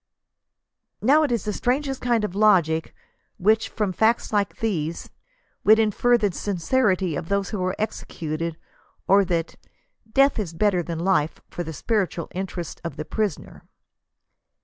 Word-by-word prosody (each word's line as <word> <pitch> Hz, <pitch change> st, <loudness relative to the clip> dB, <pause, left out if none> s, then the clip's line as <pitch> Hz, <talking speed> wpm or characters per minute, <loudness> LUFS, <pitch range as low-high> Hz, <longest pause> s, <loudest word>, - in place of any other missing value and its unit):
Now 285 Hz, +7 st, +5 dB
it 295 Hz, -4 st, +1 dB
is 235 Hz, -5 st, -1 dB
the 210 Hz, -, -1 dB
strangest 270 Hz, +4 st, -1 dB
kind 240 Hz, -3 st, +1 dB
of 210 Hz, -, -2 dB
logic 175 Hz, -6 st, +3 dB, 0.4 s
which, 215 Hz, +4 st, +2 dB
from 205 Hz, -4 st, -2 dB
facts 220 Hz, +3 st, +1 dB
like 205 Hz, -1 st, 0 dB
these, 170 Hz, -7 st, -3 dB, 0.5 s
would 215 Hz, +1 st, +7 dB
infer 225 Hz, +3 st, +3 dB
the 210 Hz, -3 st, 0 dB
sincerity 190 Hz, -, 0 dB
of 160 Hz, -, -5 dB
those 200 Hz, 0 st, 0 dB
who 200 Hz, -4 st, -2 dB
are 185 Hz, +1 st, -1 dB
executed, 165 Hz, -6 st, -4 dB, 0.5 s
or 200 Hz, +1 st, +6 dB
that 170 Hz, -2 st, -2 dB, 0.3 s
" 225 Hz, -, -33 dB
death 275 Hz, 0 st, +4 dB
is 180 Hz, -6 st, -3 dB
better 195 Hz, -1 st, +2 dB
than 170 Hz, -1 st, -5 dB
life 165 Hz, -3 st, +1 dB
for -, -, -5 dB
the 160 Hz, -, -6 dB
spiritual 185 Hz, -1 st, -1 dB
interests 180 Hz, -2 st, -5 dB
of 170 Hz, -, -5 dB
the 155 Hz, -, -5 dB
prisoner." 210 Hz, -7 st, -3 dB
200 Hz, 150 wpm, -24 LUFS, 170-220 Hz, 0.5 s, would